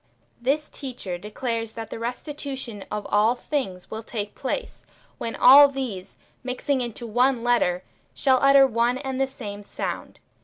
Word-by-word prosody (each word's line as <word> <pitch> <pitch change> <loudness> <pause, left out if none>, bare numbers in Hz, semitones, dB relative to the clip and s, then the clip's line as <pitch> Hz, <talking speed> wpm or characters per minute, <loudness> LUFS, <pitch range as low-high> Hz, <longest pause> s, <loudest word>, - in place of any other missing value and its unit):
This 290 +5 +1
teacher 240 -10 -6
declares 225 +2 -3
that 225 -1 -7
the - - -5
restitution 250 -3 -5
of 210 -1 -4
all 215 +4 +4
things 245 -10 -4
will 220 - -4
take 210 -2 -5
place, 470 - -4 0.4
when 230 - -4
all 280 +3 +9
these, 255 -9 -5 0.3
mixing 260 +2 -1
into 240 0 -5
one 245 +2 +2
letter, 210 -7 +2 0.3
shall 260 -2 +3
utter 275 0 +7
one 240 0 +1
and 265 0 -3
the 270 - +2
same 210 -6 -7
sound. 205 - -5
245 Hz, 150 wpm, -25 LUFS, 220-270 Hz, 0.4 s, all